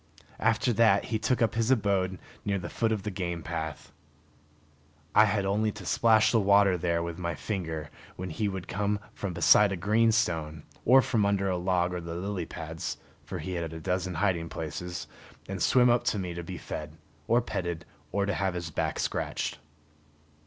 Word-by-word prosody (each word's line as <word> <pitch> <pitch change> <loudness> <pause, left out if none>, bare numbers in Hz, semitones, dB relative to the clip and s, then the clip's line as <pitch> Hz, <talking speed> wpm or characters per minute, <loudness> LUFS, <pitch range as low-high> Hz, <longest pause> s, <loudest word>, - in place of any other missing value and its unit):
After 115 +3 +2
that 105 -3 +4
he 110 - +1
took 120 +2 +1
up 115 - +1
his 115 +1 0
abode 100 -6 +2 0.3
near 100 -1 0
the 85 -2 -6
foot 115 -1 0
of 105 -3 -1
the 105 - -3
game 85 -3 -3
path. 80 -3 -5 1.2
I 105 - +7
had 105 -2 0
only 105 +2 +1
to 100 -4 -10
splash 110 +1 +4
the 115 - +4
water 100 -1 +5
there 85 -1 0
with 85 +1 -5
my 85 -2 -2
finger 80 -4 -4 0.2
when 90 -1 -5
he 105 +7 -1
would 95 -2 -4
come 105 +1 0 0.2
from 100 -3 -4
beside 100 +4 +6
a 95 - -2
green 110 +6 +3
stone, 80 -8 0 0.2
or 130 +2 +7
from 110 -4 +1
under 100 -1 +1
a - - 0
log 90 0 +1
or 90 - -3
the 85 0 -6
lily 90 -1 -3
pads 80 +1 -5 0.3
for - - -5
he 95 - -5
had 85 -2 -3
a 80 - -6
dozen 90 +2 -2
hiding 85 -2 0
places 80 -1 -5 0.4
and 95 -1 -5
swim 125 +5 +5
up 120 - +2
to - - +1
me 90 -3 -3
to 85 - -5
be 90 +1 -7
fed, 75 +1 -7 0.3
or 120 +2 +4
petted, 85 -8 -3 0.3
or 100 -1 +1
to 100 - 0
have 90 +2 -1
his 85 -2 -4
back - - -1
scratched. - - -2
95 Hz, 195 wpm, -28 LUFS, 85-105 Hz, 1.2 s, I